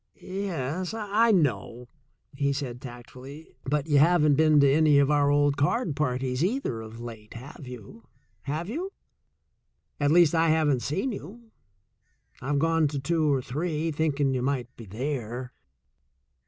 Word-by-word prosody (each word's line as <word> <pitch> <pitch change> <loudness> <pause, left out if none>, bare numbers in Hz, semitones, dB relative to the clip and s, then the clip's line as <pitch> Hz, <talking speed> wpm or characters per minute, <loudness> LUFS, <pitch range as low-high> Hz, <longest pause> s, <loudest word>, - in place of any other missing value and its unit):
"Yes, 185 - -4
I 220 +1 +2
know," 125 - 0 0.5
he 140 0 0
said 130 -3 -5
tactfully. 130 +4 -11
"But 145 +1 0
you 145 -3 +3
haven't 155 -1 +4
been 155 +1 +4
to 140 - +5
any 150 +1 +4
of 140 +1 +3
our 145 -1 +3
old 145 0 +2
card 150 - 0
parties 130 -1 -1
either 185 - -1
of 110 +1 -10
late, 115 -2 -9
have 130 +3 -10
you? 125 - -10 2.0
At 145 -1 +2
least, 170 0 +5
I 165 0 +3
haven't 150 -5 +2
seen 195 - -2
you. 220 +4 -10 0.9
I've 145 +2 -1
gone 165 +1 +2
to 145 -1 -4
two 155 +2 +1
or 135 -2 0
three, 155 +4 -2
thinking 145 -3 0
you 130 - -1
might 125 -2 -2
be 115 - -11
there." 125 +2 -4
145 Hz, 140 wpm, -26 LUFS, 130-160 Hz, 2.0 s, to